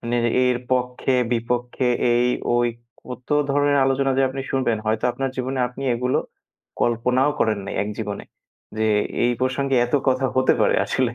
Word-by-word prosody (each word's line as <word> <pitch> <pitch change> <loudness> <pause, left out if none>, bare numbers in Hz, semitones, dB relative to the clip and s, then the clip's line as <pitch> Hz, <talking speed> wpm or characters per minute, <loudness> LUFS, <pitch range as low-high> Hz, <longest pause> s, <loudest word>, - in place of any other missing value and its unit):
মানে 120 0 -2 0.3
এর 125 -1 +1
পক্ষে-বিপক্ষে 125 -1 0 0.3
এই-ওই 120 0 +1 0.4
কত 125 0 -9 0.2
ধরনের 145 0 +2
আলোচনা 135 0 +1
যে - - +4
আপনি 135 +1 -5
শুনবেন 125 -5 0
হয়তো 110 +1 0
আপনার 135 +1 -3
জীবনে 130 +1 -3
আপনি 125 +2 -9
এগুলো 125 +2 0 0.6
কল্পনাও 125 +4 +2
করেন 110 -2 +2
নাই - - -6
এক 105 - -4
জীবনে। 105 -2 -4 0.5
যে 110 - +1 0.4
এই 120 - +3
প্রসঙ্গে 130 +1 0
এত 120 - -4
কথা 130 0 +2
হতে 130 - +4
পারে - - +3
আসলে 125 -2 0
125 Hz, 150 wpm, -22 LUFS, 120-130 Hz, 0.6 s, যে